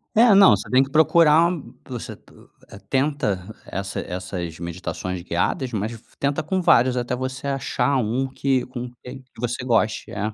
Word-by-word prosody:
É, 225 0 +6
não, 195 0 +8
você - - -7
tem 130 +1 +5
que 135 - -7
procurar 160 +2 +5
u 135 -7 -9
você 125 -3 -6
t - - -23 0.4
eh, 100 - -11
tenta 130 -9 -1
essa 95 0 -4
essas 90 -2 -5
meditações 90 +1 -5
guiadas, 90 +9 -1
mas 110 0 -2
v 115 -2 -10 0.2
tenta 140 +2 0
com 185 +5 -1
vários, 125 -4 +4
até 125 0 -1
você 130 +1 -5
achar 140 +1 0
um 125 +3 0
que 135 -1 0
com 125 -1 -6
que 130 +1 -9 0.2
você 120 +1 -3
goste. 115 -3 0
É. 105 +1 -3
125 Hz, 175 wpm, -23 LUFS, 105-140 Hz, 0.4 s, não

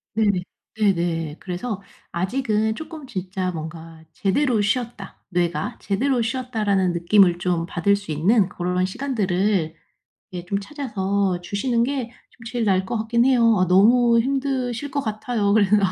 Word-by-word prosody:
네네. 205 -5 +2 0.3
네네. 170 -7 0
그래서 195 +3 -4 0.3
아직은 220 +3 0
쪼끔 315 -1 -8
진짜 185 -4 -3
뭔가 160 0 -8
'제대로 220 - +1
쉬었다 215 -1 -3
뇌가. 170 -4 -1
제대로 245 +5 0
쉬었다.'라는 220 -7 0
느낌을 175 0 +4
좀 175 -2 0
받을 200 +3 +1
수 200 -6 -7
있는 190 +6 +3
그런 180 +1 -1
시간들을 195 - 0 0.6
예 175 0 -6
좀 200 +2 -1
찾아서 200 -7 -1
주시는 230 +6 0
게 255 -3 -2 0.2
좀 230 - -18
제일 240 -2 -1
나을 190 -2 +2
것 230 - -2
같긴 235 +2 +1
해요. 235 -5 +4
아 185 -1 +2
너무 235 +5 +5
힘드실 265 0 -1
것 285 - -1
같아요. 215 -2 -1
그래서 210 -1 +4
205 Hz, 300 characters per minute, -22 LUFS, 180-240 Hz, 0.6 s, 너무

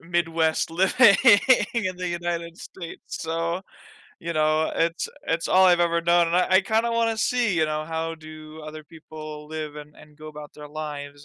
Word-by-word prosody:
Midwest 165 -2 0
living 195 +5 +5 0.6
in 185 -5 -1
the 180 0 -4
United 170 -1 -4
States, 170 -3 -10 0.2
so, 165 +3 -2 0.6
you 170 0 -4
know, 155 +1 +1
it's 165 +1 0 0.2
it's 165 +1 -1
all 190 +1 +5
I've 175 -1 +5
ever 170 -1 +2
known 170 0 +3
and 170 - +1
I 180 - +3
I - - +6
kinda 225 +3 0
wanna 230 -1 +1
see, 225 -3 0
you 160 - +3
know, 155 0 -3
how 165 0 -3
do 155 0 -12
other 155 0 -9
people 155 -1 -10
live 155 -1 -6
and 150 0 -11
and 150 -1 -18
go 155 0 -10
about 150 -1 -10
their 150 -1 -11
lives 145 -2 -7
165 Hz, 180 wpm, -24 LUFS, 155-175 Hz, 0.6 s, I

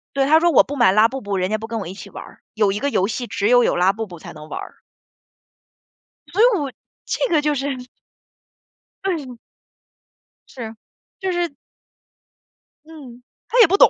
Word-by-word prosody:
对， 275 -1 +3
她 310 +3 +6
说：” 345 +1 +3
我 285 - +7
不 285 - -6
买 240 -8 +5
拉 215 +3 +6
布 265 +3 -6
布， 200 -3 -2
人 185 +1 0
家 215 - +1
不 220 +1 -7
跟 225 0 -3
我 195 - -5
一 185 - -6
起 - - -10
玩 - - -8
儿， - - -16
有 210 -2 +2
一 205 - -2
个 285 - 0
游 195 -8 +1
戏 240 +3 -3
只 205 - -1
有 245 +1 +6
有 - - +2
拉 185 +2 +3
布 225 +1 -4
布 175 -3 -10
才 - - -10
能 155 0 -11
玩 - - -4
儿。” - - -9 1.5
所 395 - 0
以 - - +8
我 280 -3 -3 0.3
这 - - 0
个 305 - +4
就 295 0 +1
是 275 0 -2 1.3
对。 330 -9 -2 1.2
是， 225 -3 -7 0.4
就 380 -2 -1
是 350 -1 0 1.4
嗯， 270 -7 -12 0.2
她 - - +1
也 455 - +9
不 385 +4 +3
懂。 - - +8
250 Hz, 210 characters per minute, -21 LUFS, 210-305 Hz, 1.5 s, 也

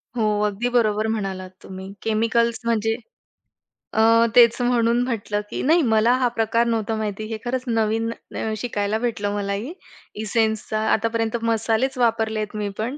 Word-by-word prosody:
हो, 230 - 0 0.2
अगदी 210 +4 -1
बरोबर 220 -3 +2
म्हणालात 195 -4 -3
तुम्ही 190 +1 -9
केमिकल्स 230 +1 +1
म्हणजे 225 -1 +1 1.0
अ, - - 0 0.4
तेच 235 -1 +7
म्हणून 240 -1 +2
म्हटलं, 210 -4 -2
की - - -4
नाही 325 +5 +4
मला 225 -1 +3
हा 250 - +4
प्रकार 230 0 +1
नव्हता 225 -1 -1
माहिती, 215 -1 -3
हे 220 0 -4
खरंच 250 +1 -2
नवीन 225 0 0 0.3
न 220 - -2
शिकायला 210 -2 -1
भेटलं 215 -4 -2
मलाही 205 - -3 0.5
एसेन्सचा 220 0 0
आतापर्यंत 225 +1 0
मसालेच 230 +3 0
वापरलेत 220 -3 0
मी 210 -1 -2
पण. 240 +7 -3
225 Hz, 145 wpm, -22 LUFS, 215-235 Hz, 1.0 s, तेच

